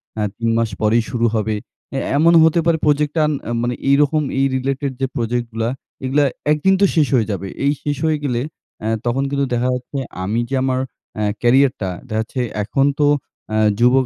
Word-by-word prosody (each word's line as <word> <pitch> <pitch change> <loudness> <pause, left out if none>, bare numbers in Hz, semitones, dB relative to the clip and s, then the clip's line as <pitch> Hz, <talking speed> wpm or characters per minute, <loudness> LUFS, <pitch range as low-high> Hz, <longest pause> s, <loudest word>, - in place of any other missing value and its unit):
অ্যা 110 - -1
৩ 115 0 0
মাস 115 -1 +1
পরেই 110 +2 +3
শুরু 120 -2 0
হবে। 110 0 0 0.4
অ্যা 135 - -2 0.2
এমনও 165 +2 +6
হতে 160 +1 +3
পারে 170 -1 +3
প্রোজেক্টটা 150 +1 +2
আর - - 0 0.3
মানে 120 +1 0 0.2
এইরকম 145 +2 +3 0.2
এই 135 - +3
রিলেটেড 135 +1 -1
যে 135 - +2
প্রজেক্টগুলা, 115 -1 -1 0.4
এগুলা 140 +3 +2 0.3
একদিন 155 +6 +3
তো - - +7
শেষ 155 -4 +4
হয়ে 115 -4 +2
যাবে। 100 -1 -4 0.2
এই 140 - +4
শেষ 145 -1 -1
হয়ে 155 -1 +2
গেলে, 125 -4 0 0.4
অ্যা 110 - -2 0.2
তখন 125 +3 +1
কিন্তু 140 0 0
দেখা 120 +1 +1
যাচ্ছে 125 +3 -6 0.3
আমি 105 +5 -1
যে 135 - -1
আমার 130 -1 +1 0.4
অ্যা 105 - -2 0.2
ক্যারিয়ারটা, 125 -5 +3 0.2
দেখা 110 -2 -1
যাচ্ছে 125 +3 -4 0.2
এখন 135 +7 +1
তো 145 - +4 0.4
অ্যা 110 - -1 0.2
যুবক 125 +2 +4
130 Hz, 190 wpm, -19 LUFS, 115-145 Hz, 0.4 s, তো